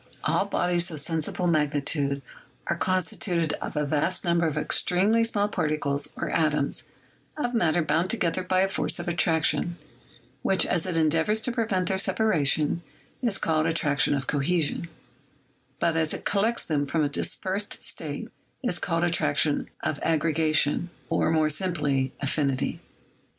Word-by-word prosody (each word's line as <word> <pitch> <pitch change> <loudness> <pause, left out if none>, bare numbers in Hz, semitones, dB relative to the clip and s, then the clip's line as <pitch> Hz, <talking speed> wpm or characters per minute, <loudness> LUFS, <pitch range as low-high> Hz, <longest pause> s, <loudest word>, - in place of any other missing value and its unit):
All - - +1
bodies 175 0 +1
of 155 -3 -2
sensible 165 +3 -1
magnitude 145 -3 +1 0.4
are - - 0
constituted 180 -3 0
of - - -5
a 150 - +1
vast 155 +6 -1
number 170 -1 +2
of 155 -1 -3
extremely 195 +8 +2
small 205 -3 +1
particles 150 -6 -1
or - - -3
atoms 150 -3 +1 0.5
of 245 -5 -2
matter 175 -6 +2
bound 160 +4 +1
together 185 -5 0
by 185 0 +1
a 195 - +3
force 195 - -2
of 175 0 -6
attraction, 170 0 +1 0.6
which, 190 - +2
as 180 +1 0
it 175 -3 -1
endeavors 165 +7 +2
to 250 - 0
prevent 215 -7 0
their 190 0 0
separation, 165 -7 +1 0.4
is 230 -6 +1
called 160 0 +1
attrac 150 -3 +1
tion - - +4
of 135 -1 -2
cohesion; 155 +3 0 0.9
but 170 -1 +1
as 160 -1 +1
it - - -9
collects 220 +4 +1
them 145 -3 0
from 160 +2 +1
a - - +2
dispersed 190 +7 -2
state - - -3 0.4
is 180 -8 0
called 165 -2 0
attraction 150 -3 +1
of 145 - -1
aggregation, 160 0 +1 0.2
or, - - +2
more 155 -1 +2
simply, 150 -6 -1
affinity. 140 -1 0
165 Hz, 150 wpm, -26 LUFS, 150-185 Hz, 0.9 s, tion